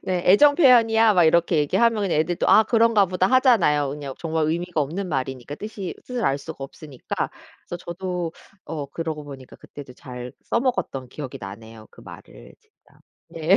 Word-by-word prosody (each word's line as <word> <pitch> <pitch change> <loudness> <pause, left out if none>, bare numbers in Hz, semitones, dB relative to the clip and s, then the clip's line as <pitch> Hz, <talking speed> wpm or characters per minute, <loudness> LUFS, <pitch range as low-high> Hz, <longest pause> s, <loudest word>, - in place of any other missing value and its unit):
네. 180 -2 -2
"애정 285 +10 +6
표현이야." 225 -7 +5
막 175 -3 +4
이렇게 170 +1 +3
얘기하면 220 +9 +2
그냥 170 -5 0
애들도 170 +2 0
"아 220 - +7
그런가 225 -2 +3
보다." 185 0 0
하잖아요 195 - +3
그냥 140 -2 -7
정말 160 -2 -1
의미가 170 0 -2
없는 175 +7 -3
말이니까 135 -1 -4
뜻이 210 -3 -6
뜻을 250 -2 -3
알 135 - +1
수가 145 -1 -8
없으니까. 135 -1 -6 0.3
그래서 175 - -8
저도 175 -1 -5 0.3
어 150 -2 -5
그러고 155 +1 -5
보니까 135 -3 -11
그때도 140 -3 -12
잘 125 -1 -9
써먹었던 235 - -2
기억이 135 -1 -7
나네요 110 +2 -11
그 - - -17
말을 - - -14
진짜. - - -30 0.3
네. 165 +4 +2
165 Hz, 380 characters per minute, -23 LUFS, 140-205 Hz, 0.3 s, 아